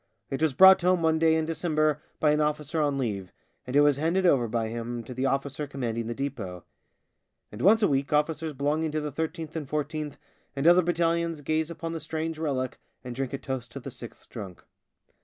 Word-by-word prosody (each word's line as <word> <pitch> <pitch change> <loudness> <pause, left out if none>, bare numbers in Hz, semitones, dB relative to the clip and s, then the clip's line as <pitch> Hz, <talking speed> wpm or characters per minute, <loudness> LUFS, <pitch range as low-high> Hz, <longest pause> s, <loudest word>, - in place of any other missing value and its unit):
It 135 - -2
was 160 -3 +2
brought 190 +4 +8
home 180 -1 +2
one 160 0 +3
day 160 0 +4
in 160 -1 +1
December 155 -2 0 0.2
by 150 - +4
an 150 +1 +2
officer 150 +1 -1
on 145 -2 +1
leave, 100 -8 -3 0.4
and 125 - -4
it 145 - +7
was 145 -2 +4
handed 170 +5 +1
over 135 -9 +4
by 115 0 -1
him 120 +1 -4
to 125 - -8
the 130 +2 0
officer 140 +2 -2
commanding 115 -4 -3
the 120 - -3
depot. 110 -11 -5 0.9
And 105 - -8
once 220 +4 +5
a - - +6
week 135 0 0
officers 155 +1 0
belonging 150 +3 0
to 155 - 0
the 150 -1 -4
13th 160 +1 -4
and 150 -4 -4
14th 150 -1 -3 0.4
and 140 +1 -2
other 175 +2 +7
battalions 170 -2 0
gaze 155 +2 0
upon 165 0 -5
the 165 - -3
strange 160 +1 -4
relic 130 -5 -2 0.2
and 125 -1 -6
drink 135 0 -3
a 140 - -2
toast 130 -5 -5
to - - -5
the - - -8
Sixth - - -11
Drunk. 95 -4 -9
150 Hz, 210 wpm, -27 LUFS, 130-160 Hz, 0.9 s, brought